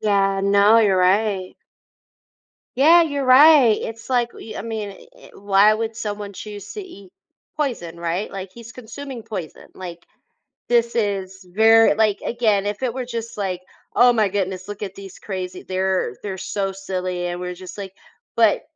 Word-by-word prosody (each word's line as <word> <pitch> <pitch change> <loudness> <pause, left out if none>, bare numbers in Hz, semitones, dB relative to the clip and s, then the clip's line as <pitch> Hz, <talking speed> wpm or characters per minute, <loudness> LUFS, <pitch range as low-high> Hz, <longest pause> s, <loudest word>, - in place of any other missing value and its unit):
Yeah. 195 -2 +1
No, 200 +2 +5
you're 200 -4 +3
right. 190 0 +1 1.2
Yeah, 325 +6 +6
you're 285 -4 -1
right. 260 -3 +7
It's 225 +3 -7
like, 240 -2 +1
y 220 - -10
I - - -4
mean, 220 -2 -5
e 470 - -16
e - - -16
why 205 +1 +4
would 225 0 -3
someone 205 -2 -5
choose 205 0 -9
to 420 - -6
eat 200 - -13 0.5
poison, 175 - -3
right? 170 +4 -2
Like, 190 -1 -7
he's 235 0 -11
consuming 255 0 -9
poison. 185 -8 -7
Like, 175 -2 -9 0.6
this 235 -1 +2
is 195 -3 -2
ver 225 -1 +6
like, 215 -2 +2
again, 215 -4 +1
if 205 +4 -3
it 240 -2 -1
were 255 -1 -4
just 230 -2 -6
like, 185 -3 -3 0.3
"Oh, 245 +2 +6
my 215 -3 +2
goodness, 185 -1 -3
look 205 0 -8
at 195 -1 -6
these 195 -1 -11
crazy 185 -2 -6
they're 185 -8 -1
they're 190 -2 -4
so 195 +1 -3
silly." 185 -2 -4
And 175 0 -4
we're 180 0 -4
just 185 +2 -10
like 195 -2 -7 0.4
but 225 -2 +4
205 Hz, 170 wpm, -21 LUFS, 190-230 Hz, 1.2 s, right